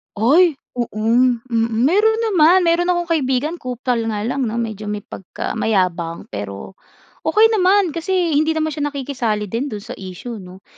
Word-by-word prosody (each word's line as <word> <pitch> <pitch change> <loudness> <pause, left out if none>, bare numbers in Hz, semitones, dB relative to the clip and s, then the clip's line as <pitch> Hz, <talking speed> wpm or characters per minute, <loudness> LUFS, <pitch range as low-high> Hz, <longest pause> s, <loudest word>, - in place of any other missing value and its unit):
Ay, 295 - +4 0.2
oo, 240 - +1
mm, 235 +2 +2 0.4
meron 425 - +3
naman, 355 +2 +5
meron 340 +1 +2
akong 350 -1 0
kaibigan 295 +2 0
kupal 250 -1 -2
nga 210 -2 -2
lang 255 +3 -1
'no 220 - -4
medyo 220 -3 -4
may 210 -1 -4
pagka 190 - -7
mayabang, 180 -6 -1
pero 100 - -7 0.5
okey 450 +1 +5
naman 385 -3 +3
kasi 345 +1 0
hindi 310 +2 +2
naman 315 0 0
siya 290 0 -2
nakikisali 255 -7 -2
din 255 +5 -1
dun 210 -4 -7
sa - - -7
issue 195 +5 -7
'no, 185 +1 -13
255 Hz, 160 wpm, -19 LUFS, 215-335 Hz, 0.5 s, naman